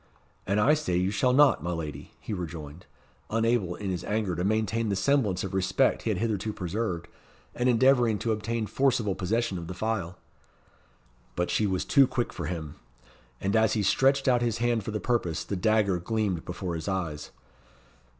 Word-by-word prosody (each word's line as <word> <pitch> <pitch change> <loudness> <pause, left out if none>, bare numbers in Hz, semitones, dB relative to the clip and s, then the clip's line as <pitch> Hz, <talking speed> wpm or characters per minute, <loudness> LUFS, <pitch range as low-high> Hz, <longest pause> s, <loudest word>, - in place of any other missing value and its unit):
"And 100 +2 +1
I 140 +8 +5
say 90 - 0
you 90 +2 +1
shall 115 +5 +2
not, 140 - +5
my 90 +3 -3
lady," 80 -3 -6
he - - -6
rejoined, 85 -3 -7 0.4
unable 115 -5 +1
in 100 -2 -4
his 90 - -3
anger 105 -4 -1
to 90 - -2
maintain 110 +2 0
the 100 - 0
semblance 105 -3 +1
of 95 - -5
respect 95 0 +2
he - - -2
had - - 0
hitherto 110 -2 -1
preserved, 90 -2 -3 0.5
and 125 +1 +1
endeavouring 125 -2 +4
to 115 - -1
obtain 110 +1 -2
forcible 115 -2 +1
possession 100 +1 -1
of 85 - -7
the 90 - -6
phial. 100 -6 -2 1.2
But 90 0 -1
she 105 - +2
was 95 -2 -1
too 140 -3 +5
quick 120 -1 -2
for - - -5
him. 80 -4 -5 0.6
And 100 +2 -1
as 110 -1 +3
he 105 - 0
stretched 135 +7 +3
out 125 -2 +4
his 115 -2 0
hand 120 -2 0
for - - -5
the 105 0 -2
purpose, 95 -10 -1
the 100 - -4
dagger 100 -1 +2
gleamed 100 -2 -2
before 90 0 -4
his 80 -1 -5
eyes. 85 -6 -3
105 Hz, 185 wpm, -27 LUFS, 90-115 Hz, 1.2 s, I